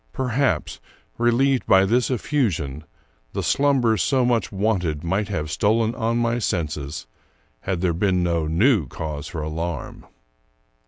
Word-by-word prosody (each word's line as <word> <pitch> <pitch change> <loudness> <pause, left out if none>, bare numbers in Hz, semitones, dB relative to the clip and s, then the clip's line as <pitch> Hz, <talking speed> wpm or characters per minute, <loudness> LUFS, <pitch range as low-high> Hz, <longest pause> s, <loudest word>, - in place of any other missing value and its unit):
Perhaps, 125 - -1 0.4
relieved 125 +3 +2
by 95 0 +5
this 120 +5 +2
effusion, 95 - -1 0.5
the - - -2
slumber 135 -6 +2
so 130 +7 +2
much 120 -5 +1
wanted 95 -7 -1
might 95 +4 -1
have 75 -3 -3
stolen 110 +4 +1
on 115 -1 -1
my 120 0 +1
senses, 75 - -3 0.5
had 90 +5 -3
there 90 -2 +1
been 90 +1 +1
no 85 -2 0
new 95 - +3
cause 75 +1 -6
of - - -12
alarm. 80 0 -5
95 Hz, 130 wpm, -23 LUFS, 80-120 Hz, 0.5 s, by